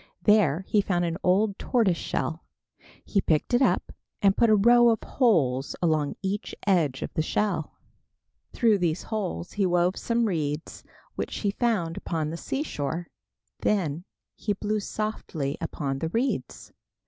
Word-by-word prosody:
There 190 -6 +4
he 210 - +3
found 175 -3 0
an 165 +1 -3
old 195 +2 +2
tortoise 225 -8 +2
shell. 165 -1 -3 0.6
He 200 - +1
picked 160 +8 0
it 245 - +4
up - - +2 0.3
and 195 -1 +4
put 235 - +4
a 215 - +6
row 240 +3 +6
of 225 -2 +1
holes 145 - +1
along 155 -4 +1
each 200 +2 -3
edge 165 -10 +2
of - - -6
the 160 - +1
shell. 175 -1 -1 0.8
Through 220 -4 +3
these 170 -1 0
holes 200 -5 -4
he 205 -2 0
wove 175 +1 +2
some 235 0 0
reeds 155 -5 -3 0.3
which - - -4
he 205 - +1
found 200 -8 0
upon 155 -2 -2
the 165 - -5
seashore. 170 - -3 0.5
Then 175 -6 0 0.3
he 210 - -1
blew 210 +1 -1
softly 195 -9 -3
upon 135 -2 -3
the 160 - -2
reeds. 230 - -2
185 Hz, 150 wpm, -26 LUFS, 160-215 Hz, 0.8 s, a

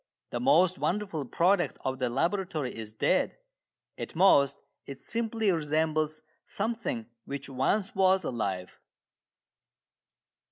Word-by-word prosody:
The - - -2
most 185 -9 +4
wonderful 185 -7 -1
product 175 +6 +2
of 130 0 -1
the 125 -2 0
laboratory 165 0 -1
is 110 -1 -7
dead. 110 - +1 0.6
At - - -6
most 145 -6 +5 0.3
it 135 -1 -8
simply 225 0 0
resembles 155 -1 0 0.2
something 220 - -3 0.2
which 140 0 -5
once 160 +10 0
was 190 -1 +3
alive. 95 -9 -3
160 Hz, 110 wpm, -29 LUFS, 135-195 Hz, 0.6 s, most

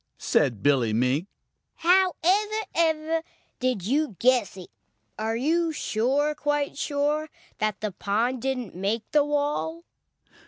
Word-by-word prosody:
said 120 -8 +1
Billy 130 -6 +3
Mink. 130 - +1 0.5
"How 365 +1 +3
ever, 420 +4 +2
ever, 320 0 +1 0.4
did 250 -8 -1
you 275 0 0
guess 245 -6 +2
it? 185 - -10 0.5
Are 220 +1 -1
you 325 +7 +1
sure, 280 +2 0
quite 295 -1 -1
sure 295 +2 -1 0.3
that 215 -1 -1
the 215 -1 -2
pond 225 +7 -1
didn't 255 -5 -3
make 200 +5 -1
the 300 -1 +4
wall?" 295 +3 -1
270 Hz, 125 wpm, -26 LUFS, 215-310 Hz, 0.5 s, the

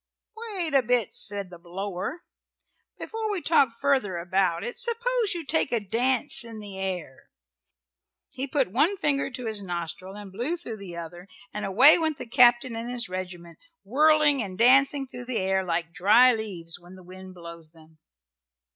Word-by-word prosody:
"Wait 340 -5 -1
a 275 - +5
bit," 245 -2 0
said 200 -2 +2
the 175 - -11
blower. 190 - -5 0.7
"Before 445 -1 -4
we 400 - -2
talk 285 -8 +2
further 265 -10 +1
about 175 0 0
it 240 - -5
suppose 475 -3 0
you 335 -3 -5
take 310 0 +1
a 235 - +1
dance 245 +6 +1
in 225 -2 -9
the 200 -2 -9
air." 180 -8 -5 1.0
He 270 +2 -4
put 270 -8 0
one 305 - +2
finger 280 -5 0
to 250 -2 -8
his 215 -2 -2
nostril 180 +1 -6
and 205 -2 -10
blew 245 - -2
through 235 -10 -7
the 190 -4 -9
other 170 +2 -9 0.3
and 210 -1 -4
away 255 - +6
went 315 -3 -1
the - - -7
captain 240 0 +4
and 230 +1 -5
his 245 -5 -2
regiment, 180 -2 -7 0.2
whirling 295 +4 +3
and 190 -4 -6
dancing 270 +4 +4
through 245 -1 -9
the 245 -2 -3
air 190 0 0
like 170 -2 -3
dry 230 +8 +5
leaves 185 -8 -5
when 175 +1 -15
the 185 - -14
wind 185 +1 -12
blows 170 -2 -10
them. 160 -1 -21
220 Hz, 175 wpm, -26 LUFS, 185-275 Hz, 1.0 s, away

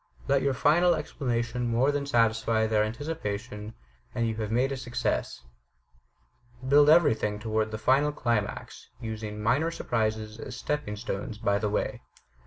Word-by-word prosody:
Let 140 -1 +3
your 140 -1 +1
final 170 +6 +4
explanation 125 -5 -2
more 120 +5 +2
than 145 -1 -2
satisfy 115 -2 +2
their 110 -1 +2
anticipation, 110 -4 -5 0.4
and 115 -2 +1
you 110 - -1
have 110 -1 -3
made 125 +4 +2
a - - -1
success. 125 - -2 1.2
Build 145 +2 +6
everything 110 -10 +4
toward 110 0 -1
the 110 - -4
final 135 +6 +3
climax, 120 -7 -3
using 110 -2 -5
minor 145 +9 +2
surprises 110 -8 -2
as - - -7
stepping 150 -8 -2
stones 105 -1 -5
by 100 -2 +1
the 105 -1 -1
way. 105 - -2
115 Hz, 145 wpm, -28 LUFS, 110-140 Hz, 1.2 s, Build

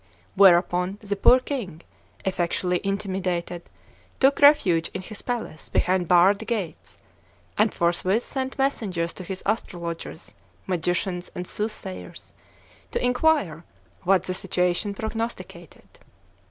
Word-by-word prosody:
Whereupon, 180 0 +4
the 205 -1 -3
poor 250 +5 +6
king, 230 - -5 0.4
effectually 180 -1 0
intimidated, 185 -3 -3 0.5
took 270 +1 +4
refuge 190 - +5
in 190 - -4
his 215 +2 -8
palace 235 -10 -5
behind 180 -1 +1
barred 180 +4 +5
gates; 210 -8 -4 0.6
and 215 +1 +3
forthwith 185 +6 +1
sent 265 -1 -4
messengers 200 -11 -1
to 185 - -9
his 190 +1 -6
astrologers, 170 -6 -4 0.3
magicians, 180 0 -1
and 180 - -4
soothsayers, 95 - -6 0.6
to - - -1
inquire 250 - +2 0.4
what 190 -1 +3
the 185 - -3
situation 180 +3 -1
prognosticated. 225 +2 -6
190 Hz, 110 wpm, -25 LUFS, 175-220 Hz, 0.6 s, poor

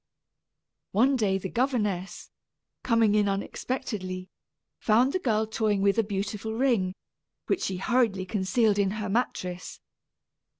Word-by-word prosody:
One 255 +7 +4
day 205 -6 +1
the 190 - -4
governess, 210 -6 -1 0.5
coming 230 -3 +3
in 210 -1 +3
unexpectedly, 195 -2 -4 0.5
found 240 +5 +3
the 370 - +1
girl 220 -8 +1
toying 215 -2 0
with 200 +3 +3
a - - +4
beautiful 205 +2 -3
ring, 225 -8 +1 0.5
which 380 - 0
she 190 - -2
hurriedly 220 -3 +1
concealed 205 +2 +1
in 200 -1 +3
her 210 -2 -3
mattress. 185 -5 -2
210 Hz, 125 wpm, -27 LUFS, 195-235 Hz, 0.5 s, One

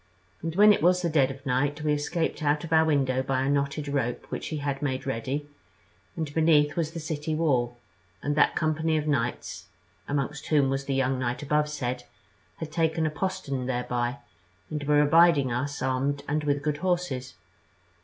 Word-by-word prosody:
And 165 0 -4
when 210 +2 +7
it - - -1
was 180 +2 +3
the 170 - 0
dead 140 -4 +3
of 135 +1 -9
night 145 +3 0
we 150 -1 +2
escaped 155 +4 -2
out 150 +1 +1
of 165 -1 -3
our 160 0 +6
window 135 -4 +2
by 130 0 -1
a 135 - 0
knotted 140 +1 -1
rope 135 -4 -2
which - - -4
he 155 - -3
had 140 -1 -3
made 130 -3 -2
ready, 135 +3 -3 0.7
and 155 -3 -4
beneath 150 -2 +3
was 165 -3 0
the 170 - -4
city 155 0 -3
wall; 125 -7 +1 0.5
and 145 0 0
that - - +3
company 155 0 +1
of 150 - -1
knights, 115 - -2 0.4
amongst 145 +1 -2
whom 140 -3 +3
was 135 0 -2
the 135 - -1
young 130 -1 +1
knight 125 +2 -2
abovesaid, 145 -4 -1 0.5
had 160 -1 -6
taken 160 0 +1
a 155 - 0
postern 145 -7 -3
thereby, 125 0 -1 0.5
and 150 -1 -3
were 150 0 +4
abiding 155 -3 +5
us 135 +3 -2
armed 135 +2 0
and 150 +1 -1
with 145 -1 0
good 150 -1 0
horses. 170 - -2
145 Hz, 185 wpm, -27 LUFS, 130-155 Hz, 0.7 s, when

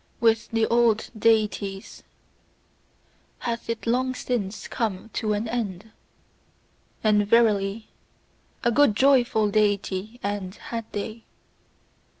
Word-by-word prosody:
With 225 -1 +2
the 225 -1 +1
old 230 -2 +2
Deities 210 -3 0 1.4
hath 235 -1 -4
it 230 -1 -3
long 255 +2 +1
since 215 -6 -3
come 220 -1 -3
to 215 -1 -1
an 210 +2 -2
end: 220 -3 -4 1.1
and 210 -2 +3
verily, 215 -2 +2 0.7
a 235 - +3
good 285 -4 +4
joyful 240 -4 +3
Deity 205 +1 0
end 200 -1 -3
had 230 -1 -7
they! 220 +2 -5
220 Hz, 105 wpm, -25 LUFS, 205-230 Hz, 1.4 s, good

